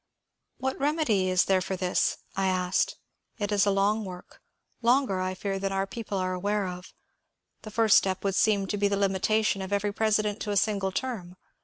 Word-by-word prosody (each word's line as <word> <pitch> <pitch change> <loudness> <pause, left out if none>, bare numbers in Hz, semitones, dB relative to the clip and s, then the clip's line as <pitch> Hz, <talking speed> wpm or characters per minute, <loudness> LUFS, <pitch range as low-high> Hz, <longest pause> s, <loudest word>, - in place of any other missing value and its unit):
What 265 0 -3
remedy 275 - +1
is 185 0 +3
there 190 -1 +2
for 190 +1 -3
this? 180 -1 0
" - - -29
I 195 0 +1
asked. 185 0 +1 0.2
" - - -48
It 205 -2 -2
is 205 0 +3
a - - +5
long 200 +2 +2
work 180 -2 -10 0.2
— - - -54
longer 240 -5 +2
I 185 0 -2
fear 195 +1 -3
than 195 0 -2
our 195 0 0
people 210 0 -5
are 185 0 -1
aware 200 +2 -1
of. 180 0 -7 0.7
The 215 - -9
first 220 -1 +5
step 190 -1 -3
would 195 -1 0
seem 200 0 +2
to 205 +2 -3
be 205 0 +2
the 200 0 0
limitation 200 +1 +1
of 190 +1 -6
every 205 0 0
president 215 -1 +1
to 210 - -3
a 205 - 0
single 195 -1 +1
term. 190 -6 -4
200 Hz, 210 wpm, -27 LUFS, 190-215 Hz, 0.7 s, a